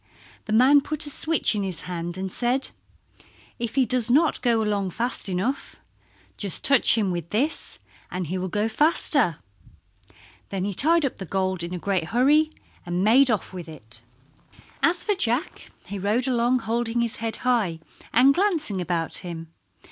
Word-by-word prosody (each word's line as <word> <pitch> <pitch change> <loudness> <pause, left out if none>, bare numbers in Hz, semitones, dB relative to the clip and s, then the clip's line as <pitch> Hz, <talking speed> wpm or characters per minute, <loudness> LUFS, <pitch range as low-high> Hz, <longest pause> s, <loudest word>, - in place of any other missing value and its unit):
The - - -6
man 260 +6 +5
put 305 +2 -1
a 290 - 0
switch 320 -1 +2
in 210 - -2
his 190 -4 -2
hand 175 0 -5
and 190 0 -4
said, 250 +5 -1 0.9
"If 235 0 -4
he 265 -2 +3
does 245 -2 -1
not 305 +6 +2
go 230 -3 +2
along 205 -3 -1
fast 235 +2 -4
enough 210 +10 -3 0.6
just 200 -5 -2
touch 275 -3 +6
him 205 -4 0
with 170 -2 -5
this 280 +9 -2 0.3
and 180 0 -4
he 185 +4 -3
will 185 - -3
go 210 +4 -1
faster." 280 - +1 1.1
Then 195 -2 -3
he 200 - -3
tied 320 - +2
up 270 - -3
the 190 - -7
gold 185 0 -2
in 170 +1 -5
a - - -4
great 185 -1 -1
hurry, 280 - +3 0.3
and 175 +1 -2
made 255 +6 +5
off 215 -4 -2
with 175 -3 -8
it. 120 -7 -13 0.8
As 350 +1 +1
for 420 - +1
Jack 275 - -2 0.2
he 200 - -6
rode 215 +7 +1
along 245 0 +1
holding 235 +1 -1
his 235 -2 +2
head 225 0 -3
high 215 -10 +1 0.3
and 260 +4 +5
glancing 315 - +2
about 170 -2 -2
him. 165 -2 -8
225 Hz, 170 wpm, -24 LUFS, 185-260 Hz, 1.1 s, touch